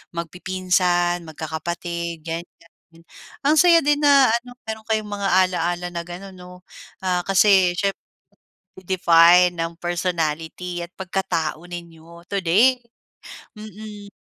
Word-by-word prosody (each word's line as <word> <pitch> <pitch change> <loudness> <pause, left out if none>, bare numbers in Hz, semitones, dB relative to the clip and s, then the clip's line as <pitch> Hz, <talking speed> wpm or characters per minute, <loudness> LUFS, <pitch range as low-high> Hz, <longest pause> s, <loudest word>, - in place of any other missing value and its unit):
magpipinsan, 175 0 0
magkakapatid, 170 +1 -5
ganiyan. 165 0 -10 0.4
Ang 295 +3 +3
saya 345 -2 +6
din 295 +1 +2
na 275 -4 +6
ano, 240 +2 -3
meron 220 0 -6
kayong 215 -1 -1
mga 200 -1 -2 0.2
ala-ala 175 0 -2
na 170 0 -4
gano'n 185 +3 -9
'no, 180 0 -13 0.4
ah, 180 -1 +1
kasi, 190 -2 +4
siyempre 195 +2 -1 0.8
nade-define 180 -1 +5
ng 165 0 -3
personality 175 0 -3
at - - -19
pagkatao 185 -4 -2
ninyo 170 -1 -11
today! 200 +7 +3 0.8
Mm. 210 -1 -10
180 Hz, 110 wpm, -22 LUFS, 170-200 Hz, 0.8 s, saya